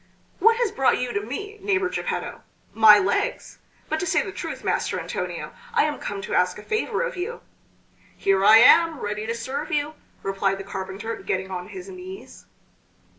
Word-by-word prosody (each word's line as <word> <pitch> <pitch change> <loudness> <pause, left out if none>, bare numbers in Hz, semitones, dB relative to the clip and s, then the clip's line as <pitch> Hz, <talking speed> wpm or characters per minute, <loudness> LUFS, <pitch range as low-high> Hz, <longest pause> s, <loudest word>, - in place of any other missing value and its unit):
"What 455 +1 +5
has 475 -4 +1
brought 270 - +2
you 250 -1 -3
to 200 - -1
me, 405 - -6
neighbor 390 -2 +1
Geppetto?" - - -4 0.3
"My 220 -1 +8
legs. 200 0 -1 0.3
But 315 - -1
to 360 - -2
say - - +2
the 390 - -6
truth, - - -6
Master - - -1
Antonio, - - -5 0.2
I 445 - +5
am 300 -1 -2
come 200 -1 -5
to - - -5
ask 180 0 +2
a 210 - -10
favor 440 - -1
of - - -4
you." 425 +7 -4 0.8
"Here 195 0 +2
I 215 +2 +9
am 320 +6 +6
ready 210 0 -4
to 230 - -2
serve 270 +5 -4
you," 295 +1 0 0.3
replied 195 0 0
the 195 - -7
carpenter 195 +3 -5
getting 190 0 -3
on 180 -1 -5
his 370 - -9
knees. 375 0 -10
250 Hz, 180 wpm, -24 LUFS, -, 0.8 s, I